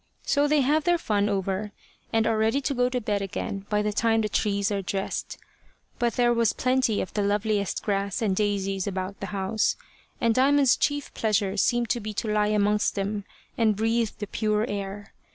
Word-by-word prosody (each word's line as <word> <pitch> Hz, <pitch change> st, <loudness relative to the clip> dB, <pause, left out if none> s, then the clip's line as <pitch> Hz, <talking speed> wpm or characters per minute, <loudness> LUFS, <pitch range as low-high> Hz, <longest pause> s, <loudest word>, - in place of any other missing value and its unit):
So 285 Hz, 0 st, +2 dB
they 300 Hz, 0 st, +3 dB
have 295 Hz, +4 st, +2 dB
their 350 Hz, 0 st, +4 dB
fun 210 Hz, -9 st, 0 dB
over, 195 Hz, +1 st, -2 dB, 0.4 s
and 225 Hz, 0 st, +2 dB
are 225 Hz, -, +2 dB
ready 220 Hz, +5 st, +2 dB
to 280 Hz, 0 st, -1 dB
go 250 Hz, -1 st, +2 dB
to 250 Hz, 0 st, -1 dB
bed 210 Hz, -3 st, -1 dB
again 195 Hz, +1 st, -4 dB
by 210 Hz, 0 st, +1 dB
the 210 Hz, 0 st, -1 dB
time 225 Hz, +1 st, +2 dB
the 215 Hz, -, -1 dB
trees 200 Hz, -1 st, 0 dB
are 200 Hz, -1 st, -1 dB
dressed. 195 Hz, +1 st, -3 dB, 0.6 s
But 240 Hz, -2 st, +1 dB
there 240 Hz, -1 st, +3 dB
was 230 Hz, -2 st, +2 dB
plenty 255 Hz, -4 st, +1 dB
of -, -, -6 dB
the 210 Hz, -, 0 dB
loveliest 205 Hz, -1 st, 0 dB
grass 200 Hz, -1 st, -1 dB
and 205 Hz, -4 st, +1 dB
daisies 195 Hz, -2 st, -1 dB
about 190 Hz, 0 st, -4 dB
the 200 Hz, -, -4 dB
house, 195 Hz, +3 st, 0 dB, 0.4 s
and 230 Hz, -2 st, +2 dB
Diamond's 270 Hz, +1 st, +4 dB
chief 290 Hz, -1 st, -1 dB
pleasure 205 Hz, -3 st, 0 dB
seemed 240 Hz, +2 st, +1 dB
to 240 Hz, -, +1 dB
be 215 Hz, -1 st, -6 dB
to 220 Hz, -, -2 dB
lie 210 Hz, 0 st, +2 dB
amongst 210 Hz, 0 st, +1 dB
them, 200 Hz, 0 st, -2 dB, 0.3 s
and 220 Hz, -2 st, +3 dB
breathe 225 Hz, +1 st, +1 dB
the 210 Hz, -, -4 dB
pure 215 Hz, +1 st, 0 dB
air. 200 Hz, -1 st, -5 dB
210 Hz, 195 wpm, -26 LUFS, 200-235 Hz, 0.6 s, their